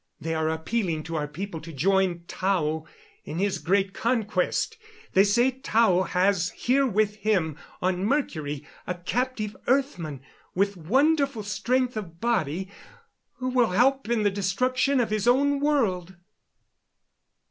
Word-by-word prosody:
They 165 0 -3
are 160 0 0
appealing 160 0 -1
to 165 +1 -5
our 150 -2 -1
people 165 +2 -6
to 165 - -9
join 180 +3 +1
Tao 160 -5 -1 0.4
in 155 - -6
his 195 +1 0
great 195 +1 +1
conquest. 220 -6 0 0.4
They 195 - +6
say 235 +6 +3
Tao 230 -7 +2
has 180 0 +1
here 270 +2 +2
with 210 -1 +1
him, 190 -8 0 0.3
on 185 0 0
Mercury, 155 - -1 0.2
a 180 - -2
captive 215 +3 -2
earthman, 210 - 0 0.3
with 200 +2 +1
wonderful 270 - +2
strength 245 +5 0
of 170 -6 -6
body, 190 -6 0 0.7
who 255 -1 -3
will 245 -6 +2
help 265 +3 +3
in 235 -3 +1
the 205 - +3
destruction 250 +8 +1
of 230 -3 0
his 215 0 0
own 280 +3 +3
world!" 205 - 0
200 Hz, 135 wpm, -26 LUFS, 175-245 Hz, 0.7 s, They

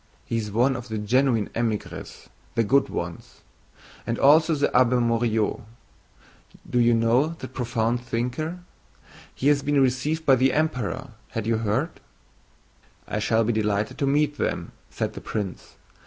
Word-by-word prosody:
He 115 - -2
is 110 -2 -3
one 125 +6 +2
of 125 0 -6
the 110 -2 -4
genuine 115 +1 +1
émigrés, 115 -3 -4 0.3
the 115 - +3
good 135 +5 +3
ones. 85 -1 -6 0.7
And 115 0 -1
also 155 +3 +5
the 145 - +1
Abbé 125 0 +3
Morio. 115 -2 0 1.0
Do 125 - 0
you 120 0 +4
know 120 +8 +2
that 130 - -9
profound 120 -1 -1
thinker? 125 +9 -3 0.7
He 135 - -1
has 145 -1 +3
been 145 0 +1
received 135 +5 +1
by 135 -2 +6
the 130 +1 +3
Emperor. 135 -5 -1 0.2
Had 115 -2 -3
you 115 0 +1
heard?" 110 -1 -1 1.1
"I 105 - -2
shall 110 +1 +2
be 120 +2 0
delighted 105 -1 -1
to 140 - +1
meet 145 +1 +1
them," - - -2 0.2
said - - -3
the - - -8
prince. 100 -4 -5
120 Hz, 155 wpm, -25 LUFS, 115-140 Hz, 1.1 s, by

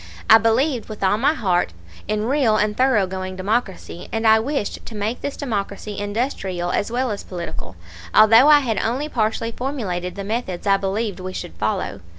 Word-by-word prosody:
I 220 - +10
believed 235 +3 +1
with 215 -2 -7
all 200 +2 +2
my 280 +6 +3
heart 180 - 0 0.3
in 215 0 -1
real 250 -4 +2
and 210 0 0
thoroughgoing 190 -7 +1
democracy, 190 -2 -3
and 225 0 -2
I 220 0 +6
wished 265 -1 -3
to 225 - -8
make 215 +3 -3
this 285 - -4
democracy 205 -5 -4
industrial 205 -5 -2
as 205 - -1
well 250 0 0
as 205 - -5
political, 170 - -7 0.4
although 225 +5 +7
I 295 -1 +7
had 225 -6 -1
only 260 +7 -1
partially 225 -2 -1
formulated 200 -10 -4
the 200 - -5
methods 205 -4 -3
I 195 -1 +4
believed 195 +1 -2
we 185 0 -6
should 80 - -6
follow. 90 0 -2
215 Hz, 175 wpm, -21 LUFS, 190-240 Hz, 0.4 s, I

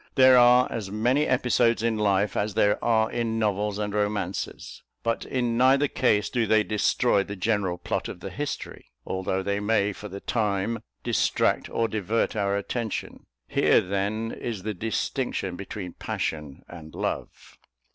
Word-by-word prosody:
There 130 -1 +7
are 125 0 +6
as 110 -4 -4
many 125 +8 +1
episodes 120 -2 +2
in 115 -1 +1
life 100 -1 +1
as 105 0 -1
there 105 0 +2
are 110 -1 +2
in 115 -2 -1
novels 105 -1 0
and 105 -1 -3
romances; 105 0 -3 0.2
but 115 0 -1
in 120 -3 -1
neither 135 +3 +5
case 105 -7 +1
do 120 -3 0
they 110 0 +4
destroy 105 -2 +2
the 100 +1 -7
general 100 -2 0
plot 90 - -3
of - - -8
the 95 +2 -7
history, 145 +10 -5 0.2
although 95 0 -2
they 100 +1 -1
may, 105 -1 +1
for 105 - -8
the 100 0 -7
time, 105 +1 -1 0.2
distract - - +1
or 115 - 0
divert 110 +1 -1
our 100 -1 0
attention. 110 +2 -4 0.2
Here, - - +4
then, 100 +4 -2
is 110 -6 -5
the 110 0 -2
distinction 110 -1 -2
between 95 -1 -7
passion 75 -3 -4
and 80 -3 -11
love. - - -5
105 Hz, 155 wpm, -26 LUFS, 100-115 Hz, 0.2 s, There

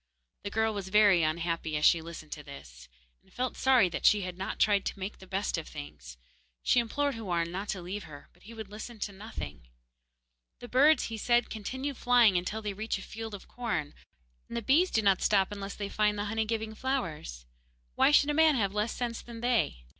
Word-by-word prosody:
The - - -3
girl 220 +1 +1
was 195 -2 -5
very 205 -3 +5
unhappy 160 0 -1
as 150 - +1
she 165 - +5
listened 165 -2 -9
to 150 - -6
this, 65 - -12 0.3
and - - -27
felt 255 0 -2
sorry 255 -7 +4
that - - -5
she 210 -1 +5
had 180 -1 -5
not 190 +1 -4
tried 205 -2 +3
to - - -3
make 195 +2 -6
the 190 - -13
best 190 -2 -1
of 160 - -9
things. 70 -4 -9 0.5
She 250 - +4
implored 285 +5 0
Houarn 175 -7 -2
not 195 +3 -5
to 185 -4 -3
leave 195 +3 -5
her, 145 -2 -12
but - - -26
he 225 - -12
would 220 -2 -7
listen 220 +2 -8
to 205 0 -4
nothing. 190 - -8 0.9
'The 245 - -10
birds,' 290 +5 +5
he 225 - -4
said, 240 +2 +2
'continue 260 +6 -4
flying 240 -5 +4
until 195 +5 -2
they 205 -1 -2
reach 215 +2 -3
a 190 - -9
field 225 -1 -7
of 195 - -12
corn, 215 -12 -3 0.5
and 235 - -5
the 235 - -3
bees 320 - +4
do 220 - +1
not 195 -2 +3
stop 195 -1 +3
unless 200 -1 -6
they 205 - -4
find 210 0 +1
the 205 - -2
honey 220 +1 -1
giving 220 0 -3
flowers, 170 - -3
and - - -34 0.4
why - - +4
should 290 0 +5
a - - -1
man 315 -1 +5
have 200 -5 0
less 210 +2 -1
sense 235 -2 -3
than 235 -1 -10
they? 150 - 0
210 Hz, 220 wpm, -30 LUFS, 175-230 Hz, 0.9 s, very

